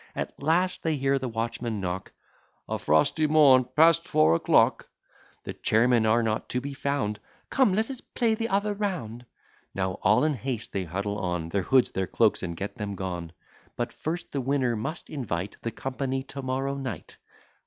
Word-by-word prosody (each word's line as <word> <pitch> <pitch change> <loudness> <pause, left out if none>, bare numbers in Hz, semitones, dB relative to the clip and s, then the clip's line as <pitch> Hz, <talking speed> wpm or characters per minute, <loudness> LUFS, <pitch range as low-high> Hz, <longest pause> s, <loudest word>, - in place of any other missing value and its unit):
At - - -5
last 175 +5 +1
they 160 -2 0
hear 135 0 +1
the 130 -1 -3
watchman 115 -1 -3
knock, 95 0 -4 0.6
"A - - -2
frosty 80 - +2
morn 140 -5 +6
past 165 +2 +5
four 80 +1 +4
o'clock." 85 - +3 0.5
The - - -5
chairmen 115 0 +3
are 115 +2 +3
not 110 -1 -2
to 125 - -1
be 140 +2 -6
found, 135 -7 -2 0.3
"Come, 255 -8 +3
let 220 +2 +1
us 260 - -7
play 230 -3 0
the 225 +1 -1
other 205 +2 +1
round." 155 - -4 0.5
Now 95 -1 -2
all 105 +7 +4
in 155 0 +2
haste 130 -2 -4
they 95 -2 -1
huddle 100 +5 -3
on 90 -3 -2
Their 100 +3 0
hoods, 130 +5 +3
their 95 -1 -2
cloaks, 110 -3 +2
and 85 -2 -4
get 100 - -5
them 105 -2 -4
gone; 90 -3 -5 0.4
But, - - -3
first, 170 +3 -4
the 140 - -2
winner 130 -2 +1
must 135 +10 -4
invite 100 - -4
The 115 - -2
company 135 +2 -3
to 140 +1 -7
morrow 135 +1 -2
night. 130 - -6
125 Hz, 180 wpm, -27 LUFS, 100-145 Hz, 0.6 s, morn